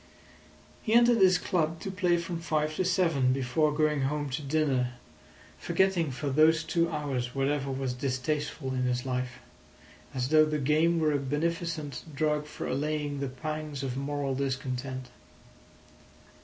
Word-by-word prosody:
He 220 - -1
entered 240 -1 +6
his 185 -2 +6
club 165 -3 -1
to 195 - -4
play 180 -2 +2
from 170 0 -4
five 155 -1 -1
to - - +2
seven, 165 -8 +2
before 135 +4 +1
going 150 -1 +1
home 145 +1 -1
to 145 +5 -2
dinner, 135 -4 0 0.7
forgetting 175 -2 +1
for 140 +2 -3
those 155 +3 +4
two 170 -1 +1
hours 140 -6 -3
whatever 140 0 0
was 135 -1 -2
distasteful 135 +2 -2
in 130 -1 0
his 125 0 -1
life, 125 -1 -2 0.8
as 125 0 -1
though 155 0 +6
the 155 0 -1
game 155 +4 +2
were 155 -1 +2
a 145 - +1
beneficent 155 +1 -2
drug 150 +1 0
for - - -6
allaying 145 +1 -2
the 140 -1 -2
pangs 150 +1 -5
of 130 -2 -3
moral 140 0 -2
discontent. 130 -1 -3
150 Hz, 150 wpm, -29 LUFS, 135-160 Hz, 0.8 s, entered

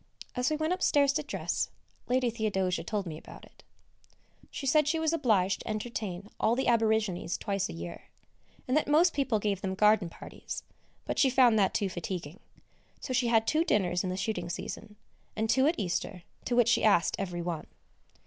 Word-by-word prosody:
As 250 +2 +1
we 310 - 0
went 315 +3 0
upstairs 285 -6 +3
to 305 - 0
dress, 290 - -2 0.4
Lady 250 -1 +1
Theodosia 195 -5 -1
told 210 -3 -2
me 155 -3 -6
about - - -13
it. - - -21 0.9
She 275 - -6
said 300 +2 +3
she 325 +2 +1
was 320 0 +1
obliged 210 - +2
to - - -10
entertain 215 -3 -4
all 230 - +3
the 265 - -1
Aborigines 220 -7 +1
twice 200 -2 -2
a - - -6
year, 85 +1 -8 0.6
and 255 - +1
that 305 - +2
most 325 +4 +4
people 265 -6 +1
gave 205 -2 -1
them 190 -1 -2
garden 210 -2 +4
parties; - - -8 0.4
but - - -2
she 270 - +5
found 245 -4 +5
that 195 -2 +2
too 205 - +1
fatiguing, 180 -1 -5 0.6
so 260 - -5
she 250 -1 +2
had 225 -1 +3
two 315 +7 +2
dinners 185 - +1
in 185 - -2
the 185 - -3
shooting 185 -3 -2
season, 210 +4 -6 0.4
and 220 +1 0
two 265 +1 +4
at 320 - +1
Easter, 180 -2 -3 0.2
to 240 - 0
which 240 -1 +4
she 235 - +3
asked 200 -5 +4
every 175 -3 -3
one. 170 -3 -4
220 Hz, 190 wpm, -29 LUFS, 185-260 Hz, 0.9 s, she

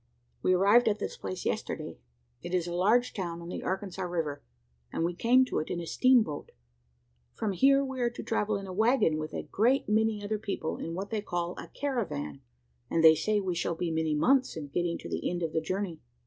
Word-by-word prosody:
"We 185 - +3
arrived 200 +6 +5
at 210 -1 +2
this - - -4
place 95 -1 -6
yesterday. - - -3 0.4
It 175 +1 -3
is 175 -2 +1
a 175 - -4
large 215 +8 +3
town 170 -4 -4
on 170 0 -8
the - - -4
Arkansas 190 0 -3
river: 165 -5 -2 0.5
and - - -1
we 175 - -1
came 250 +8 +4
to - - -1
it 155 - -4
in 175 - -2
a 170 - -5
steam 255 +6 +4
boat. 150 -6 -7 0.8
From 215 - -1
here 275 +8 +4
we 265 -1 -4
are 240 - +2
to 240 - -8
travel 215 -2 0
in 195 - -7
a 185 - -7
waggon 220 -6 +3
with 155 0 -4
a - - -3
great 245 +6 +2
many 215 0 +1
other 210 +1 -2
people 195 -6 -3
in 165 +1 -5
what 195 +3 -5
they 220 -2 -1
call 175 -3 -2
a - - -8
`caravan,' 190 - -3 0.5
and 165 - +1
they 160 -1 +10
say 210 +6 +1
we 190 -3 -1
shall 170 0 -1
be 170 0 -2
many 160 -1 0
months 260 - +3
in 145 -3 -6
getting 170 +3 -1
to - - -9
the - - -2
end 175 -1 -3
of 160 - -2
the 160 - +1
journey. 185 -1 -3
185 Hz, 225 wpm, -29 LUFS, 165-220 Hz, 0.8 s, they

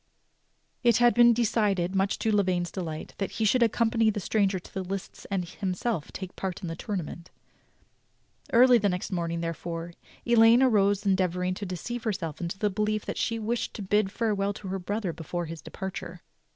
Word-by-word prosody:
It 235 -3 +5
had 240 0 +5
been 240 0 +7
decided, 205 -6 +1
much 195 +1 +1
to 220 - 0
Lavaine's 180 -3 +1
delight, 165 -5 -5
that 195 - -2
he 220 - 0
should 250 +4 +3
accompany 225 0 +3
the 210 - -1
stranger 200 0 +1
to 180 - -12
the 190 - -2
lists 190 +1 -6
and 190 -3 -1
himself 185 0 -3
take 190 -1 -7
part 190 +1 -4
in - - -3
the 165 - -4
tournament. 175 -3 -5 1.2
Early 250 0 +7
the 205 -1 +2
next 180 +1 -3
morning, 170 -2 -2
therefore, 165 0 -4 0.3
Elaine 235 +1 +6
arose 205 -4 +3
en 195 -1 +4
deavoring 180 0 0
to 200 +2 -5
deceive 230 +7 -5
herself 180 -9 -3
into 170 +2 -3
the 210 0 0
belief 210 +1 -1
that - - -4
she 230 - 0
wished 225 +2 -2
to 210 - -5
bid 200 0 +1
farewell 205 -2 0
to 195 -2 -8
her 195 +1 -2
brother 200 -1 -2
before 170 +2 -4
his 165 -1 -7
departure. 190 +4 -7
195 Hz, 185 wpm, -27 LUFS, 180-220 Hz, 1.2 s, been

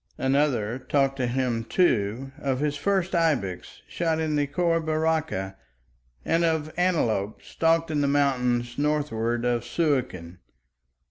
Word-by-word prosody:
Another 130 -4 +1
talked 135 0 0
to 125 -2 0
him, 120 -2 -1
too, 125 - +1
of 135 -3 -1
his 150 0 0
first 190 +4 0
ibex 145 - -1
shot 165 -2 -1
in 155 -1 -1
the 145 -1 +1
Khor 165 +3 +1
Baraka, 155 -11 -1 0.7
and 165 +1 +2
of 160 -2 0
antelope 120 - 0
stalked 165 0 +1
in 150 -1 0
the 140 - +2
mountains 125 -3 +1
northward 125 -6 0
of 120 -1 0
Suakin. 120 - -2
140 Hz, 130 wpm, -25 LUFS, 120-160 Hz, 0.7 s, and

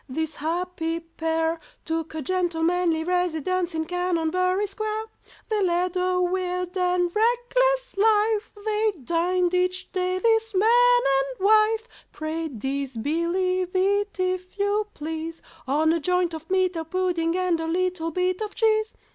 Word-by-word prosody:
this 315 +3 -3
happy 330 +1 -2
pair 325 0 -2 0.3
Took 325 -1 -3
a 310 - -3
gentlemanly 345 0 +1
residence 360 0 0
in 320 0 -1
Canonbury 360 +2 0
Square! 430 +2 -3 0.4
They 430 -2 0
led 360 0 +1
a 365 0 +1
weird 360 0 -1
and 360 -1 +1
reckless - - +1
life, 430 0 +2
They 430 0 +1
dined 355 +4 +1
each 365 +1 0
day, 365 0 0
this 445 +1 +1
man 485 +4 +5 0.2
and 275 +7 -3
wife 435 +2 +4 0.2
(Pray 320 +1 -3
disbelieve 315 - -1
it, 405 +2 +1
if 370 +1 -2
you 410 +1 +1
please), 320 +2 -5 0.2
On 310 +4 +3
a 335 - +1
joint 360 +1 +1
of 320 +1 -8
meat, 370 -1 +2
a 325 - -2
pudding, 345 0 0
and 365 -3 +1
a 325 - -3
little 360 -1 -1
bit 365 +3 -1
of 425 -1 -4
cheese. 435 -1 +1
360 Hz, 140 wpm, -25 LUFS, 330-400 Hz, 0.4 s, man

